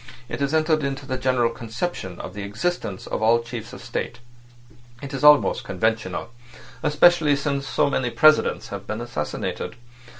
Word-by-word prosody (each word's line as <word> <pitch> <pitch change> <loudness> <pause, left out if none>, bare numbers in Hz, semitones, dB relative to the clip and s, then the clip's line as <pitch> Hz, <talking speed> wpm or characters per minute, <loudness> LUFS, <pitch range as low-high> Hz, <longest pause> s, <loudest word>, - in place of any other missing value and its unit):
It - - -4
has 140 0 0
entered 155 -1 +2
into 135 0 -3
the 130 -1 -2
general 125 -2 +1
conception 115 - -5
of 90 - -7
the 105 - -6
existence 105 - -3
of - - -3
all 115 +1 +4
chiefs 115 -1 -7
of 130 - -10
state. 120 -1 -4 0.8
It's 135 0 -6
almost 150 -3 +6
conventional—especially 120 - +1
since 140 -1 -2
so 125 - +2
many 130 -3 0
presidents 155 +4 +4
have - - -7
been 110 +1 -3
assassinated. 120 -12 -4
125 Hz, 145 wpm, -23 LUFS, 115-145 Hz, 0.8 s, almost